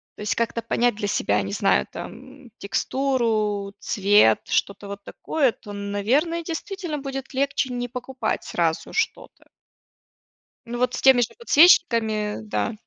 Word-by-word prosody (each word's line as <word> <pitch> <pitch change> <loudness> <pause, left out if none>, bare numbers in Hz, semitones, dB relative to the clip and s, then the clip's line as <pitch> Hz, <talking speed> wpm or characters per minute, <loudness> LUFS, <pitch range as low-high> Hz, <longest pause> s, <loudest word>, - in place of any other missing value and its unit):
То - - -11
есть 210 -1 -1
как-то 230 0 -1
понять 240 0 +1
для 205 -1 -3
себя, 105 - +1
не 100 0 -5
знаю, 65 -7 +2
там: 260 +2 -10
м, 240 - -16
текстуру, 215 -3 -1
цвет, 200 - +4
что-то 200 0 -1
вот 200 0 -8
такое, 280 +2 0
то, 205 - -12
наверное, 230 - 0
действительно 345 -1 -5
будет 270 -1 -6
легче 270 -1 -1
не 245 0 -3
покупать 255 +1 -4
сразу - - -1
что-то. - - -3 1.2
Ну 240 +1 -5
вот, 250 0 0
с - - -4
теми 265 -2 +6
же 230 - +1
подсвечниками 230 - +4
да. 215 +1 -2
240 Hz, 145 wpm, -23 LUFS, 205-270 Hz, 1.2 s, теми